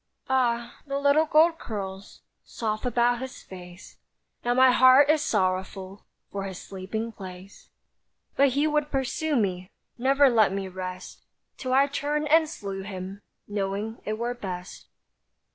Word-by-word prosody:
Ah! 240 -2 0
the 275 0 -2
little 285 +3 +3
gold 325 +2 +4
curls 195 -3 -7 0.2
Soft 215 +1 -3
about 240 0 +2
his 260 0 -8
face; 180 0 -12 0.5
Now 245 0 +1
my 260 0 +6
heart 260 +4 +7
is 310 -1 +2
sorrowful 190 -3 -2 0.2
For 195 -1 -4
his 190 -2 -6
sleeping 200 +4 -5
place. 190 -1 -11 0.7
But 275 -2 +4
he 290 - +3
would 300 -1 +1
pursue 280 +3 -1
me, 185 -5 -1 0.3
Never 275 +3 +4
let 220 -6 +4
me 195 0 -3
rest; 185 0 -7 0.3
Till 255 - -4
I 275 +1 +5
turned 290 +2 -2
and 320 0 +5
slew 195 -10 -6
him, 190 0 -7 0.3
Knowing 205 +2 -3
it 215 0 -3
were 240 +2 -2
best. 185 -6 -7
225 Hz, 145 wpm, -26 LUFS, 195-275 Hz, 0.7 s, heart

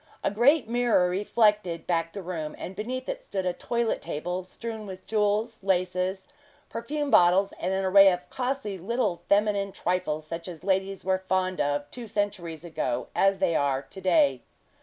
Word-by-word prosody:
A - - +1
great 250 +7 +4
mirror 235 -6 +3
reflected 205 -3 +1
back 165 -1 0
the 200 - -6
room, 160 -4 -4
and 190 - -7
beneath 255 +5 -4
it - - -4
stood 195 - -4
a 180 - +1
toilet 235 +5 -1
table, 175 +3 -3
strewn 220 +3 -7
with 185 -1 -9
jewels, 215 +1 0
laces, 185 0 0 0.4
perfume 285 +5 -3
bottles, 180 +3 +5
and 185 - -1
an 190 0 0
array 195 +1 +7
of 180 0 -4
costly 250 -6 -3
little 200 -3 -1
feminine 200 -1 +2
trifles 155 -5 -2
such 165 +2 -6
as 170 -2 -9
ladies 190 0 -1
were 190 0 +2
as 190 - -30
fond 185 -1 0
of 145 0 -1
two 240 -2 -7
centuries 190 -6 -3
ago 140 -7 -2
as 195 0 +3
they 170 - +1
are 140 -2 +1
to 190 +8 -11
day. 285 - +3
190 Hz, 175 wpm, -27 LUFS, 175-215 Hz, 0.4 s, array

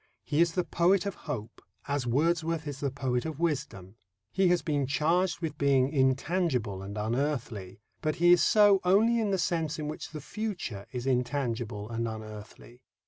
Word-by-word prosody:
He 150 +3 +1
is 170 -1 +3
the 180 - +1
poet 180 +4 +2
of 200 - -2 0.2
hope, 115 -5 -5 0.3
as 140 -3 -1
Wordsworth 165 +4 +1
is 140 -2 -5
the 140 - -1
poet 130 -2 -1
of 160 -2 -5
wisdom. 135 - -3 0.3
He 190 -1 +2
has 175 -3 +2
been 145 -4 0
charged 170 +6 +1
with 155 -3 -4
being 140 0 +3
intangible 130 - +1
and 100 +2 -7
unearthly, 115 -4 -2 0.2
but 155 -2 0
he 175 +1 +4
is 175 - +6
so 205 -2 +5
only 220 +6 +4
in 215 -2 0
the 195 - +1
sense 165 -3 -1
in 150 -1 -4
which 155 - -6
the 155 - -7
future 175 - -5
is 125 -1 -5
intangible 120 -5 -1
and 115 0 -2
unearthly. 110 +2 -9
145 Hz, 175 wpm, -29 LUFS, 120-170 Hz, 0.3 s, is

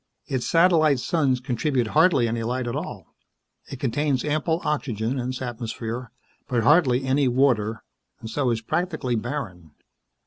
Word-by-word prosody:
Its 130 -4 -2
satellite 165 -5 +4
suns 135 -3 +1
contribute 125 -1 -1
hardly 155 -5 +4
any 115 0 -2
light 125 +2 -2
at 120 +1 -3
all. 140 - -6 0.6
It 135 - -7
contains 140 +1 0
ample 155 +2 0
oxygen 130 -4 -1
in 125 0 -3
its 130 0 -4
atmosphere, 120 0 -5 0.4
but 120 -4 0
hardly 135 -2 +4
any 135 +1 +2
water, 120 -4 +1 0.4
and 110 - -8
so 130 +3 0
is 115 -1 -1
practically 160 -1 -2
barren. 110 - -5
130 Hz, 145 wpm, -24 LUFS, 115-150 Hz, 0.6 s, satellite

